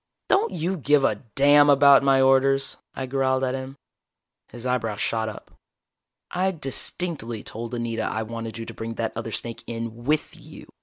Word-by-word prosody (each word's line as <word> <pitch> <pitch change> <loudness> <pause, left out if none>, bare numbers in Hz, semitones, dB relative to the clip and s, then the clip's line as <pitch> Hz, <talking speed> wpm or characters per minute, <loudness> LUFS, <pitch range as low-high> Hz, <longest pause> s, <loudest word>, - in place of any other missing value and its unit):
"Don't 400 +4 +3
you 180 +3 -2
give 145 -1 +3
a - - +3 0.2
damn 145 +1 +6
about 140 0 +7
my 135 -1 +4
orders?" 135 0 +3 0.2
I 130 - -3
growled 130 0 0
at 130 -1 0
him. 135 0 -6 0.7
His 120 0 -10
eyebrows 115 -5 -1
shot 110 -1 0
up. 105 - -11 0.8
"I 185 +2 +1
distinctly 145 - -3
told 115 +2 -6
Anita 115 -1 -2
I 110 0 -2
wanted 115 0 -6
you 115 - -6
to - - -8
bring 115 0 -6
that 115 0 -2
other 115 0 -5
snake 115 +1 -5
in 115 0 -6
with 150 +2 0
you. - - -13
130 Hz, 170 wpm, -24 LUFS, 115-140 Hz, 0.8 s, about